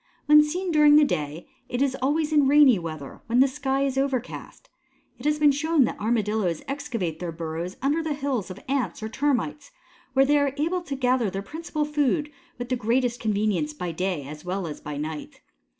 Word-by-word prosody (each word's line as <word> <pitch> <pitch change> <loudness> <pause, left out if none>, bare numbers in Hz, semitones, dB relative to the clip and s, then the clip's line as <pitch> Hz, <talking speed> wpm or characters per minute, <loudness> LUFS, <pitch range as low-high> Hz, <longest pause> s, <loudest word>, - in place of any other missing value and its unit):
When 300 0 +7
seen 355 +4 -2
during 300 -2 +6
the 300 0 +7
day 150 - -3 0.2
it 245 - -2
is 270 -1 +1
always 300 +3 +1
in 290 -3 +4
rainy 280 -6 +6
weather 155 -4 -7
when 235 +2 +2
the 270 - +6
sky 270 0 -1
is 270 -1 0
overcast. 270 - -4 0.5
It - - -11
has 300 0 +2
been 300 -1 +5
shown 310 +1 +2
that 235 - -2
Armadillos 210 -5 0
excavate 240 - -3
their 175 -2 -4
burrows 165 +2 -5
under 290 +4 +2
the 315 -2 -2
hills 275 -8 -2
of 185 +1 -8
Ants 255 -8 -2
or 220 - -3
Termites, 285 +2 -1 0.4
where 270 +1 +5
they 290 +1 +3
are 280 -1 0
able 335 +5 0
to 280 -5 -5
gather 250 -4 +1
their 195 +1 -5
principal 310 +4 -3
food 295 0 0 0.3
with 245 0 -6
the 255 - +1
greatest 245 +1 0
convenience 205 -8 0
by 175 +2 -4
day 180 -3 -2
as 150 +1 -9
well 185 +1 -3
as 155 -2 -7
by 150 -1 -6
night. 155 +1 -6
260 Hz, 200 wpm, -25 LUFS, 190-295 Hz, 0.5 s, When